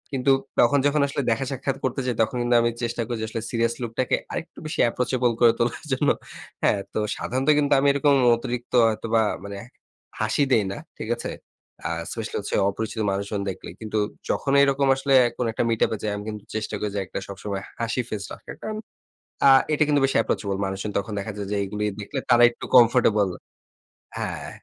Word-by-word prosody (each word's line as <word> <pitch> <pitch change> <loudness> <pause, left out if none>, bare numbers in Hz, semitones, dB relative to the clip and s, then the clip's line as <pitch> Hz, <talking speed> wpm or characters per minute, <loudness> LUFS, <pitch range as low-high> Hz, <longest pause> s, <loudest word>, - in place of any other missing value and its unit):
কিন্তু 130 +1 +2 0.3
তখন 130 +4 +5
যখন 145 0 +3
আসলে 140 0 -2
দেখা-সাক্ষাৎ 135 +2 -2
করতে 130 0 -1
যাই, 125 - -1
তখন 110 +3 0
কিন্তু 120 0 +2
আমি 120 - +2
চেষ্টা 115 0 -2
করি 120 -1 -3
যে, - - -1
আসলে 115 - -4
সিরিয়াস 115 0 +1
লুক 120 - -3
টাকে 130 - +2 0.2
আরেকটু 165 - -6
বেশি 155 - -4
অ্যাপ্রোচেবল 125 0 +1
করে 120 -1 +7
তোলার 120 +6 -1
জন্য। 135 +2 +2 0.5
হ্যাঁ, - - +3
তো - - -3 0.2
সাধারণত 130 +4 -1
কিন্তু 145 0 +2
আমি 140 - +2
এরকম 140 0 +3 0.2
অতিরিক্ত 120 +1 -5 0.2
হয়তোবা, 110 0 +1 0.2
মানে 100 0 -6 0.6
হাসি 110 +6 +1
দেই 110 -5 +4
না। - - -5 0.2
ঠিক - - -6
আছে? - - -5 0.6
আ - - -2 0.2
সসিয়ালসে - - -3
অপরিচিত 110 +2 -4
মানুষজন 100 +1 -2
দেখলে। 95 - -7
কিন্তু 110 -1 -3 0.3
যখন 135 - 0
এরকম 140 0 +2
আসলে 135 0 0 0.2
কোন 125 - -1
একটা, 115 - -1
মিট 115 -1 0
আপ - - -5
এ - - -6
যায়, 105 -1 -1
আমি 105 - -7 0.3
চেষ্টা 110 0 -3
করি 105 - -2
যে, - - 0
একটা - - -5
সবসময় 100 0 -5 0.2
হাসি 115 +2 0
ফেস 105 -2 -4
রাখতে। - - -9
কারন 215 0 -4 0.7
আ - - +9 0.2
এটা 155 - +2
কিন্তু 145 -1 +3
বেশি 135 - -1
অ্যাপ্রোচেবল। 100 -3 0
মানুষজন 95 +2 -4
তখন 100 +2 -4
দেখা 100 +2 -4
যায় 100 -1 -4
যে, - - +1
এইগুলি 105 +2 -3 0.2
দেখলে 105 +7 -5
তারা 120 0 +6
একটু 120 - -10
কমফোর্টেবল 115 -4 +5 0.9
হ্যাঁ, - - -4
115 Hz, 190 wpm, -24 LUFS, 105-130 Hz, 0.9 s, আ